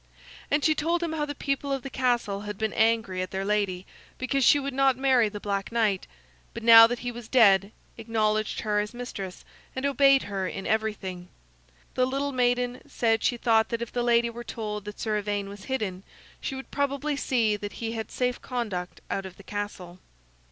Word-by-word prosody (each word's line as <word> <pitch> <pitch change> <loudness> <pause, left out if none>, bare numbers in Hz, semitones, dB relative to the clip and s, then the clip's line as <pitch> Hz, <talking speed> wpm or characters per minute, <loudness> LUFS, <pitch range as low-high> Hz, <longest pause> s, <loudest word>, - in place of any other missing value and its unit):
And 290 0 +1
she 315 - +5
told 335 +3 0
him 330 -2 -2
how 300 -2 -1
the 290 - -5
people 275 0 -2
of 270 -2 -2
the 275 - -5
castle 240 -6 0
had 210 -1 -6
been 220 0 -1
angry 225 -4 +1
at 185 - -3
their 195 0 -3
lady 200 -3 0 0.3
because 270 +1 0
she 290 - +6
would 275 -1 -4
not 270 -1 +3
marry 260 -4 +3
the 205 0 -7
Black 200 0 -3
Knight; 215 -5 +1 0.5
but 230 - -6
now 225 0 +10
that 245 +1 -2
he 245 - -1
was 240 -2 -9
dead, 200 -5 +5 0.3
acknowledged 215 -1 0
her 210 -1 +1
as 210 +3 -3
mistress 200 -7 -7 0.3
and 260 +1 -2
obeyed 275 0 +5
her 195 -2 -3
in 195 - -6
everything. 200 -5 -2 0.7
The 255 0 +2
little 275 +2 -1
maiden 245 -1 0
said 225 -4 +1
she 245 - +1
thought 225 -2 +3
that 235 -1 -2
if 235 - -8
the 245 - -1
lady 235 -1 +3
were 240 +1 -8
told 210 -3 -5
that 210 0 -8
Sir 215 -1 0
Ivaine 205 -1 -3
was 200 0 -10
hidden 210 -8 -3 0.4
she 270 - -3
would 265 -2 -9
probably 285 +1 -1
see 230 -6 +1
that 205 0 -6
he 225 -1 -4
had 220 -1 -4
a - - -18
safe 250 -1 -1
conduct 210 -8 -4
out 195 -1 -2
of 185 - -13
the 195 - -14
castle. 190 -3 -6
225 Hz, 205 wpm, -27 LUFS, 205-255 Hz, 0.7 s, now